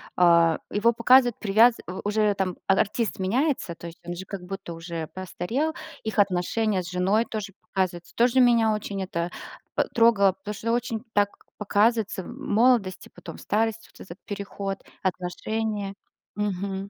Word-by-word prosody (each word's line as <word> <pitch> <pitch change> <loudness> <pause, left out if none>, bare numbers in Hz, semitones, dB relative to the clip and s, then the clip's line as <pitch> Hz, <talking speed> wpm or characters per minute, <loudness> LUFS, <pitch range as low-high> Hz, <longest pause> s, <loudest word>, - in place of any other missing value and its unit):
а, 170 -2 +5
его 230 +3 +2
показывают 245 +1 +5
привяз 220 +4 +5
у 185 +1 -5
уже, 210 0 +2
там, 185 -2 -1
а 195 - +5
артист 220 +1 0
меняется, 235 - 0
то 170 - -9
есть 170 - -11
он 175 - -4
же 190 - -7
как 195 -1 -6
будто 190 -2 -6
уже 165 -1 -5
постарел, 220 - -3 0.3
их 220 -1 -2
отношения 195 +1 +1
с 175 - -7
женой 190 +5 +2
тоже 210 -4 -5
показываются, 180 -3 -3
тоже 245 +2 +3
меня 235 -3 +5
очень 200 -2 -4
это 170 -1 -3 0.4
п - - +1
трогало, 215 -5 +5
потому 205 +2 -7
что 220 +3 -2
очень 235 -1 -1
так 205 0 +3 0.3
показывается 210 -1 +1
молодость 235 -6 +1
и - - -21
потом - - -10
старость, 225 +1 -1
вот - - -20
этот 175 +2 -11
переход, 200 -1 -5 0.2
отношения. 200 +3 -2 0.4
Мгм. 195 -1 -2
205 Hz, 155 wpm, -25 LUFS, 185-225 Hz, 0.4 s, а